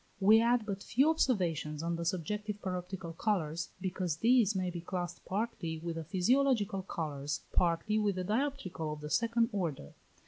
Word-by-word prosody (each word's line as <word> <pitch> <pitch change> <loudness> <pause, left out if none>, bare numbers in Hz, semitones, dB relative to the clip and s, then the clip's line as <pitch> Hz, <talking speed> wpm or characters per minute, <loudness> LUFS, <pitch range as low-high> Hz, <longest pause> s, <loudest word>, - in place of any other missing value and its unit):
We 215 +3 +7
add 235 -1 +3
but 200 -2 -4
few 275 +10 +3
observations 165 - 0
on 170 0 0
the 170 0 -4
subjective 205 +4 -2
paroptical 180 -2 -5
colours, 165 -5 -1
because 185 -3 -2
these 225 0 +4
may 185 -1 0
be 170 -1 -5
classed 175 0 -4
partly 195 -5 -2
with 165 +1 -4
the 165 - -4
physiological 210 - +2
colours, 150 -6 -3
partly 180 +5 +2
with 205 -2 +1
the 185 - -2
dioptrical 210 - -2
of 150 - -9
the 150 0 -6
second 230 0 +2
order. 165 - -3
185 Hz, 165 wpm, -32 LUFS, 165-215 Hz, -, We